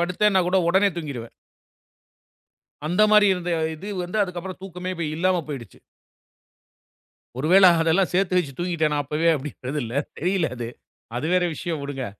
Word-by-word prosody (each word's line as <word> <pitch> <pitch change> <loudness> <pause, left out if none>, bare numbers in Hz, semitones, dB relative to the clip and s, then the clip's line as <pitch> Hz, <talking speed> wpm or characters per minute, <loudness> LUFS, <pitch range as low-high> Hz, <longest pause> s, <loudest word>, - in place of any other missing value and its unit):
படுத்தேன். 180 +4 +2
நான் 185 -2 +3
கூட 190 +1 +3
உடனே 190 +3 +4
தூங்கிருவேன். 140 -8 -6 1.5
அந்த 180 +6 +2
மாரி 210 -1 +6
இருந்த 180 -1 -4 0.2
இது 195 +7 -8
வந்து 180 +5 -3
அதுக்கப்புறம் 180 0 -7
தூக்கமே 185 -1 -6
இப்ப 170 -1 -3
இல்லாம 185 +2 +2
போயிடுச்சு. 125 -9 -8 1.6
ஒருவேள 180 +7 +6 0.2
அதெல்லாம் 165 +3 +2
சேத்து 185 0 +1
வச்சு 150 -6 -2
தூங்கிட்டேனா 165 -4 0
அப்பவே 150 +4 0
அப்படிங்கிறது 140 0 -5
இல்ல, 115 - -7 0.3
தெரியல 180 0 0
அது. 120 -1 -5 0.5
அது 135 +6 -2
வேற 180 -1 +3
விஷயம் 160 -1 -4
விடுங்க. 140 -2 -4
175 Hz, 145 wpm, -23 LUFS, 150-185 Hz, 1.6 s, மாரி